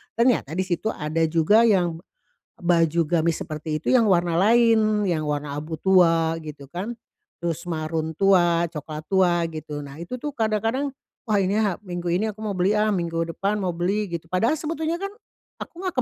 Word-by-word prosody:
Ternyata 235 - +2
di 185 - +1
situ 185 +3 -2
ada 155 -5 -2
juga 190 +9 +4
yang 175 -5 +2 0.6
baju 170 -1 +2
gamis 165 -1 +1
seperti 155 0 -4
itu - - 0
yang 240 -4 +5
warna 175 -3 +2
lain, 220 0 +4
yang 155 -2 -1
warna 145 -1 -3
abu 155 +2 -5
tua, 165 -3 +3
gitu 145 -3 -10
kan. 200 +7 -4 0.5
Tus 170 +1 -3
marun 160 0 -2
tua, 175 -3 +4
coklat 155 0 -7
tua, 180 -3 +3
gitu. 155 -2 -6
Nah, 140 -1 -9
itu 175 +10 -6
tuh 295 +4 -4
kadang-kadang, 225 +5 0 0.4
"Wah, 210 -2 +2
ini 190 +2 0
ha 205 -5 +1
minggu 175 -1 -3
ini 190 +6 +1
aku 210 - -14
mau 215 - -2
beli, 185 +3 +2
ah! 215 0 +2
Minggu 165 -1 -2
depan 200 +5 -1
mau 180 - 0
beli." 195 +5 0
Gitu. 165 -1 -5
Padahal 230 +12 +1
sebetulnya 320 +1 -2
kan 395 +1 -4 0.5
aku 340 - -11
enggak 370 -2 -3
175 Hz, 180 wpm, -24 LUFS, 165-215 Hz, 0.6 s, yang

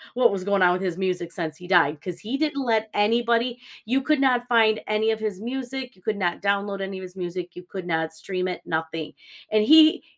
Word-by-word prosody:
what 245 -2 +4
was 195 -2 -3
going 200 0 +1
on 180 -1 +5
with 185 - -2
his 180 -3 -2
music 180 -3 -2
since 165 -2 -4
he 180 - -11
died 165 -5 +3
'cause 175 +1 -6
he 230 +8 -3
didn't 295 -2 -1
let 220 -2 +1
anybody 235 +3 +2 0.3
you 255 +5 +1
could 305 +2 +1
not 250 -2 +2
find 220 -2 +4
any 215 +1 +1
of 220 - -2
his 210 -3 -4
music, 260 +1 -5
you 185 - -24
could 215 +1 -1
not 175 -3 -1
download 200 0 -1
any 195 0 -4
of - - -8
his 180 0 -10
music, 175 -1 -5
you 180 - -9
could 180 0 -8
not 160 -1 -1
stream 185 +3 -3
it, 180 - -5
nothing. 160 -1 -3 0.4
And 215 0 +4
he 315 +4 +7
200 Hz, 230 wpm, -24 LUFS, 180-235 Hz, 0.4 s, he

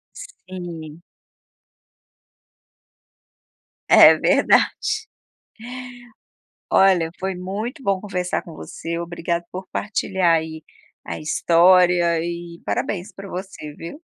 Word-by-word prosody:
Sim. 175 - -9 2.8
É - - +9
verdade. 435 0 +2 1.7
Olha, 185 -4 +4
foi 190 0 -3
muito 210 - -5
bom 195 -5 +1
conversar 180 -3 -3
com 170 - -12
você, 170 +1 -6
obrigado 170 0 -3
por 185 +1 -7
partilhar 190 -4 +1
aí 160 0 -4 0.4
a - - -6
história 175 +1 +4
e 170 0 -6
parabéns 195 0 -2
para 200 -1 -10
você, 180 -5 -7
viu. 170 - -9
180 Hz, 90 wpm, -22 LUFS, 170-190 Hz, 2.8 s, É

